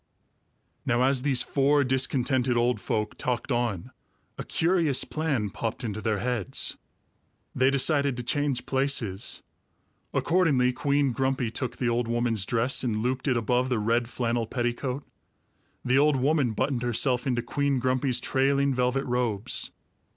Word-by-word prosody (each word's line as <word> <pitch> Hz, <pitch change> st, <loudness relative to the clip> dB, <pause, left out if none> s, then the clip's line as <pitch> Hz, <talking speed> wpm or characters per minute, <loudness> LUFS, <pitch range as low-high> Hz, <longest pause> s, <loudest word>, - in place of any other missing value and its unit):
Now 120 Hz, +1 st, +1 dB
as 135 Hz, -1 st, +2 dB
these 135 Hz, -3 st, +2 dB
four 145 Hz, +1 st, +2 dB
discontented 130 Hz, -1 st, +1 dB
old 120 Hz, -2 st, +1 dB
folk 105 Hz, +1 st, -3 dB
talked 125 Hz, +2 st, -2 dB
on, 120 Hz, -7 st, -2 dB, 0.4 s
a -, -, -6 dB
curious 165 Hz, -5 st, +2 dB
plan 140 Hz, -10 st, -2 dB
popped 115 Hz, +5 st, -4 dB
into 110 Hz, -2 st, -4 dB
their 110 Hz, -1 st, 0 dB
heads. 120 Hz, -3 st, -1 dB, 0.8 s
They 130 Hz, +1 st, +3 dB
decided 140 Hz, -1 st, +2 dB
to 125 Hz, -, -4 dB
change 140 Hz, 0 st, -1 dB
places. 130 Hz, -7 st, -1 dB, 0.7 s
Accordingly, 145 Hz, -8 st, +2 dB
Queen 140 Hz, 0 st, +1 dB
Grumpy 130 Hz, -1 st, -1 dB
took 125 Hz, +1 st, -4 dB
the 125 Hz, -, -1 dB
old 120 Hz, 0 st, 0 dB
woman's 115 Hz, -4 st, 0 dB
dress 120 Hz, +4 st, 0 dB
and 110 Hz, -3 st, -1 dB
looped 130 Hz, +3 st, -2 dB
it 130 Hz, -3 st, +2 dB
above 125 Hz, +3 st, 0 dB
the 125 Hz, -, +1 dB
red 115 Hz, +2 st, 0 dB
flannel 120 Hz, -2 st, -1 dB
petticoat; 125 Hz, +3 st, -2 dB, 0.8 s
the 130 Hz, +2 st, +3 dB
old 150 Hz, 0 st, +4 dB
woman 135 Hz, -2 st, +1 dB
buttoned 130 Hz, +2 st, -1 dB
herself 125 Hz, +2 st, +1 dB
into 120 Hz, -2 st, 0 dB
Queen 140 Hz, +2 st, 0 dB
Grumpy's 130 Hz, 0 st, +1 dB
trailing 140 Hz, +2 st, +1 dB
velvet 125 Hz, +2 st, 0 dB
robes. 120 Hz, -4 st, -1 dB
125 Hz, 145 wpm, -26 LUFS, 120-135 Hz, 0.8 s, old